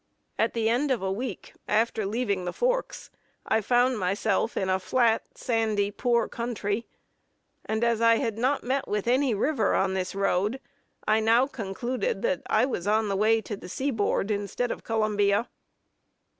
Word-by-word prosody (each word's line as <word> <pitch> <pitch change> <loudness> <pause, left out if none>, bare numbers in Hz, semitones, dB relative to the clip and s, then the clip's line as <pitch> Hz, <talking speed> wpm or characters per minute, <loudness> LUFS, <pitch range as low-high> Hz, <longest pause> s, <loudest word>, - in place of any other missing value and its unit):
At 225 - +2
the 225 -1 +1
end 250 +6 +1
of 245 -7 0
a 190 - 0
week, 245 +6 -5
after 220 -1 +1
leaving 205 -3 -1
the 180 - -3
forks, - - -1 0.3
I 220 - +2
found 245 +2 +2
myself 195 +2 0
in 190 - 0
a 185 0 +1
flat, 230 +2 +2 0.2
sandy, 220 -4 0
poor 235 +3 +1
country; 230 -2 -3 0.8
and 220 +1 -1
as 235 -1 +2
I 230 0 +6
had 225 -2 -2
not 265 +4 +1
met 265 +2 -1
with 210 +1 -2
any 255 -1 +2
river 225 -1 +1
on 190 0 +1
this 185 0 -3
road, 195 +5 0 0.5
I 215 +1 +4
now 230 +3 +4
concluded 255 - -3
that - - 0
I - - +3
was 205 -8 -3
on 215 0 +2
the 195 - 0
way 220 +3 +3
to 215 - -5
the 195 - -11
sea 275 +9 -1
board 210 -2 0
instead 205 +4 -2
of - - -6
Columbia. 210 -1 +1
225 Hz, 170 wpm, -27 LUFS, 205-245 Hz, 0.8 s, I